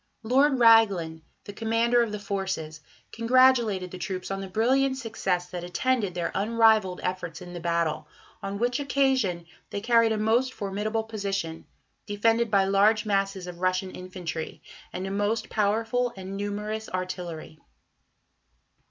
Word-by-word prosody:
Lord 265 Hz, +4 st, +3 dB
Raglan, 200 Hz, -9 st, +4 dB, 0.2 s
the 205 Hz, -, -9 dB
Commander 230 Hz, +3 st, +2 dB
of 230 Hz, -2 st, -1 dB
the 210 Hz, -, -3 dB
Forces, 190 Hz, -6 st, -4 dB, 0.3 s
congratulated 230 Hz, -6 st, +3 dB
the 185 Hz, -, -8 dB
troops 185 Hz, 0 st, -4 dB
on 195 Hz, 0 st, -3 dB
"the 195 Hz, -, -6 dB
brilliant 260 Hz, +7 st, +2 dB
success 195 Hz, -8 st, -2 dB
that 175 Hz, -1 st, -5 dB
attended 200 Hz, +1 st, -1 dB
their 175 Hz, -1 st, -2 dB
unrivalled 215 Hz, -2 st, +3 dB
efforts 180 Hz, -2 st, -3 dB
in 180 Hz, -1 st, -10 dB
the 175 Hz, -, -6 dB
battle, 170 Hz, -2 st, -1 dB, 0.3 s
on 195 Hz, +1 st, -4 dB
which 245 Hz, +4 st, 0 dB
occasion 265 Hz, -11 st, +1 dB, 0.2 s
they -, -, -4 dB
carried 230 Hz, +1 st, +3 dB
a 220 Hz, -, 0 dB
most 235 Hz, +5 st, +1 dB
formidable 210 Hz, +3 st, -2 dB
position, 195 Hz, -7 st, -4 dB, 0.4 s
defended 225 Hz, +3 st, +1 dB
by 200 Hz, -1 st, +4 dB
large 205 Hz, +3 st, +3 dB
masses 195 Hz, -2 st, -1 dB
of 175 Hz, -1 st, -9 dB
Russian 185 Hz, +1 st, 0 dB
infantry, 180 Hz, -3 st, -6 dB, 0.3 s
and 185 Hz, +1 st, -5 dB
a 195 Hz, -, -4 dB
most 205 Hz, +3 st, -1 dB
powerful 225 Hz, +4 st, +1 dB
and 190 Hz, +1 st, -7 dB
numerous 210 Hz, +2 st, -4 dB
artillery." 180 Hz, -4 st, -5 dB
200 Hz, 145 wpm, -26 LUFS, 185-225 Hz, 0.4 s, Raglan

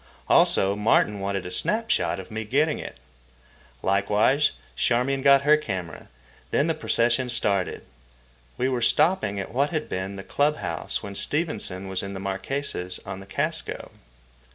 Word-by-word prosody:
Also, 95 Hz, +1 st, +4 dB
Martin 105 Hz, -1 st, +2 dB
wanted 100 Hz, -1 st, -2 dB
a 90 Hz, -, -6 dB
snap 225 Hz, -, 0 dB
shot -, -, +1 dB
of 95 Hz, +4 st, -9 dB
me 110 Hz, +1 st, -3 dB
getting 145 Hz, +8 st, +1 dB
it. -, -, -8 dB, 0.9 s
Likewise 105 Hz, +9 st, +3 dB, 0.2 s
Charmian 125 Hz, -, +1 dB
got 140 Hz, 0 st, +6 dB
her 150 Hz, +2 st, +6 dB
camera. 95 Hz, -, -5 dB, 0.4 s
Then 140 Hz, -, +2 dB
the 165 Hz, -, +1 dB
procession 125 Hz, -4 st, +1 dB
started. 100 Hz, -5 st, 0 dB, 0.7 s
We 130 Hz, -, +1 dB
were 125 Hz, -2 st, -1 dB
stopping 115 Hz, -, +2 dB
at 95 Hz, -, -6 dB
what 140 Hz, +4 st, +2 dB
had 155 Hz, -3 st, -2 dB
been 95 Hz, +1 st, -4 dB
the 95 Hz, -, -7 dB
club 145 Hz, +7 st, +1 dB
house -, -, -4 dB
when 100 Hz, -, -6 dB
Stevenson 100 Hz, -, -2 dB
was 95 Hz, -1 st, -2 dB
in 100 Hz, 0 st, -6 dB
the -, -, -5 dB
Marquesas 95 Hz, -1 st, -3 dB
on 95 Hz, -1 st, -6 dB
the 95 Hz, -, -12 dB
Casco. -, -, -3 dB
110 Hz, 155 wpm, -25 LUFS, 95-140 Hz, 0.9 s, got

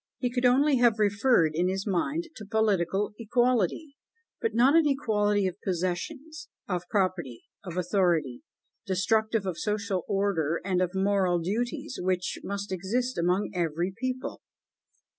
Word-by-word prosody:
He 245 Hz, -2 st, -2 dB
could 250 Hz, 0 st, 0 dB
only 275 Hz, +3 st, +4 dB
have 240 Hz, -2 st, +4 dB
referred 205 Hz, -4 st, +3 dB
in 175 Hz, +3 st, +1 dB
his 190 Hz, +1 st, -2 dB
mind 295 Hz, -, -1 dB
to 215 Hz, -, -8 dB
political 205 Hz, -2 st, 0 dB
equality, 245 Hz, -, 0 dB, 0.4 s
but 455 Hz, -, -1 dB
not 260 Hz, +6 st, +5 dB
an 330 Hz, -2 st, +5 dB
equality 210 Hz, -7 st, +1 dB
of 185 Hz, +1 st, -4 dB
possessions, 235 Hz, -, -4 dB, 0.2 s
of 180 Hz, -2 st, -3 dB
property, 180 Hz, -, -1 dB, 0.2 s
of 180 Hz, -3 st, -7 dB
authority, 175 Hz, -, +1 dB, 0.5 s
destructive 215 Hz, +2 st, +1 dB
of 185 Hz, -3 st, -3 dB
social 210 Hz, -3 st, -1 dB
order 175 Hz, -5 st, 0 dB
and 185 Hz, -2 st, +1 dB
of 180 Hz, +1 st, -1 dB
moral 190 Hz, -2 st, +2 dB
duties, 245 Hz, -, -3 dB
which 180 Hz, 0 st, -1 dB
must 200 Hz, 0 st, -4 dB
exist 235 Hz, +8 st, -1 dB
among 180 Hz, +4 st, 0 dB
every 175 Hz, +1 st, -1 dB
people. 255 Hz, +1 st, -4 dB
200 Hz, 140 wpm, -27 LUFS, 180-245 Hz, 0.5 s, not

